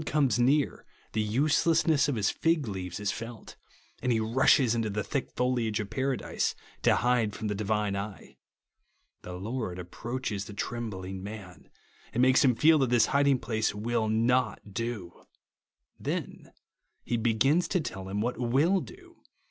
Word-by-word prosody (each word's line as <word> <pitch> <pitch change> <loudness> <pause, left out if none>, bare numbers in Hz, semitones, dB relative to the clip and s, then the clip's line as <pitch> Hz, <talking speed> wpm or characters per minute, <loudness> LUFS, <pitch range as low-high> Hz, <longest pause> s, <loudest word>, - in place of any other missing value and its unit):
79 - - -5
comes 125 -2 +2
near, 140 +4 +2 0.3
tlie 105 -1 0
uselessness 155 +4 +3
of 140 - 0
his 105 -3 +1
fig 160 -5 +1
leaves 95 -2 -5
is 105 -1 -1
felt, 115 -1 -8 0.5
and 125 - +1
he 115 - +2
rushes 120 +2 +4
into 115 -2 -1
the 105 0 -2
thick 140 -3 -3
foliage 120 -4 0
of 105 0 -5
Paradise 135 +1 -1 0.3
to - - +4
hide 115 -4 +1
from 110 - -3
the - - 0
Divine 105 0 -1
eye. 100 0 -6 0.9
The 90 - -8
Lord 100 0 -4
approaches 105 +3 -4
the 105 - -9
trembling 95 -5 -4
man, 100 -2 -9 0.4
and 120 +3 +2
makes 130 +4 +5
him 125 -4 +4
feel 155 +6 +5
that 135 -3 +2
this 120 -2 +5
hiding 140 -1 +4
place 110 -4 -1
will 110 +1 -1
not 115 -2 +1
do. 105 -6 -5 0.7
Then - - -4 0.5
he 120 - -1
begins 120 +9 +2
to 185 - +1
tell 95 - -6
him 100 +2 -2
what 120 +1 -2
will 140 +11 +3
do. 360 -2 -13
115 Hz, 160 wpm, -29 LUFS, 105-130 Hz, 0.9 s, makes